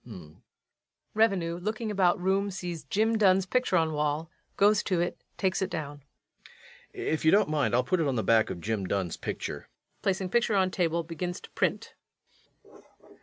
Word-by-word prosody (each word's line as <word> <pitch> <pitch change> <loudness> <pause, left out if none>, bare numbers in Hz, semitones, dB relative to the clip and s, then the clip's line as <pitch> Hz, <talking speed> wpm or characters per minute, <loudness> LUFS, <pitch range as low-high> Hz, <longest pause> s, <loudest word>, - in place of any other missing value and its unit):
REVENUE. 190 -6 +1
[Looking 215 +3 -3
about 185 -3 +2
room, 195 +2 +1
sees 180 -4 -6
JIM 220 +2 +1
DUNN's 190 -2 +4
picture 215 -1 +1
on 160 -1 +1
wall, 150 +2 -1 0.3
goes 205 +1 +4
to 180 -3 -1
it, 175 - -2
takes 190 0 0
it 190 - 0
down.] 145 -3 -5 0.9
If 380 - -2
you 160 - +5
don't 205 0 +4
mind, 145 -5 +1
I'll 125 - +3
put 180 +8 0
it 160 - +1
on 135 - 0
the 110 - 0
back 115 -1 +3
of 85 - -6
Jim 105 -2 -2
Dunn's 95 -4 -1
picture. - - -5 0.3
[_Placing 190 -1 -1
picture 235 -3 +2
on 190 -1 +2
table, 170 -2 0
begins 175 +3 -5
to - - -13
print. - - -1
180 Hz, 170 wpm, -28 LUFS, 155-200 Hz, 0.9 s, you